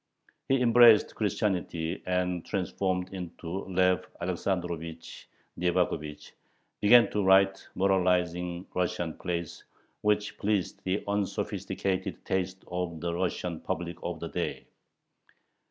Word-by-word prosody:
He 135 0 +4
embraced 115 -2 +7
Christianity, 95 -6 -1
and, 90 -1 0
transformed 95 -1 -2
into 90 0 -5
Lev 90 -1 +2 0.2
Alexandrovich 85 -2 -4 0.3
Nyevakhovich, 85 -4 -1 0.5
began 115 +3 +7
to 105 - 0
write 95 0 +4
moralizing 90 -2 +1
Russian 90 -2 -1
plays, 85 -2 -4 0.4
which 105 0 0
pleased 100 -3 -1
the 95 +2 0
unsophisticated 100 -1 -2
taste 95 0 -2
of 90 -2 -3
the 85 +1 -2
Russian 90 -1 -2
public 85 +1 -4
of - - -4
the - - -5
day. - - -3
90 Hz, 105 wpm, -29 LUFS, 85-95 Hz, 0.5 s, embraced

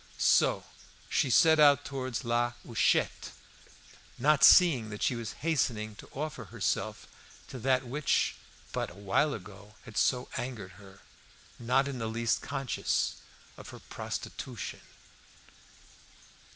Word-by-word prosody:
So - - +3 0.5
she 135 - +1
set 160 +4 +5
out 145 -3 +6
towards 130 -2 -4
La 120 +1 +1
Huchette, 115 -3 0 0.8
not 145 +3 +3
seeing 140 - +7
that 105 -1 -5
she 125 - +1
was 115 -2 -5
hastening 115 -9 0
to - - -13
offer 150 +3 -5
herself - - -3 0.4
to 130 - -7
that 130 +1 +1
which 140 +5 0 0.4
but - - -2
a - - -14
while 100 +9 +1
ago 100 +1 -12
had 115 - -10
so 125 -1 +1
angered 115 -7 -5
her, 95 -1 -16 0.6
not 130 +4 +2
in 135 -3 -5
the 115 - -2
least 115 +1 0
conscious 135 -2 -2 0.4
of - - -11
her - - -10
prostitution. - - -6
125 Hz, 125 wpm, -30 LUFS, 110-140 Hz, 0.8 s, seeing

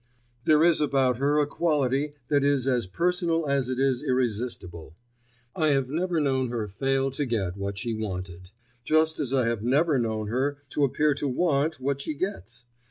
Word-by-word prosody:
There 155 0 +5
is 170 -2 +4
about 135 -4 +2
her 145 +3 +1
a 150 - +3
quality 145 -2 0
that 145 -2 +2
is 140 -3 +2
as 125 -6 +1
personal 170 - 0
as 140 -2 0
it 130 - -2
is 135 -2 +1
irresistible. 110 -10 -3 0.6
I 155 - +1
have 135 -3 +1
never 175 +1 0
known 130 -4 0
her 115 -3 -3
fail 135 +6 0
to 135 +2 -2
get 105 -9 -2
what 100 0 -4
she 115 +2 -3
wanted, 90 -4 -6 0.3
just 155 +3 +2
as 140 -4 -2
I 130 -3 +2
have 115 -3 -1
never 140 +5 +2
known 110 -2 -2
her 130 +6 -1
to 145 - 0
appear 150 +3 +1
to 145 +1 -3
want 155 +1 0
what 140 +1 -2
she 150 - -4
gets. 125 - -5
135 Hz, 180 wpm, -26 LUFS, 120-150 Hz, 0.6 s, There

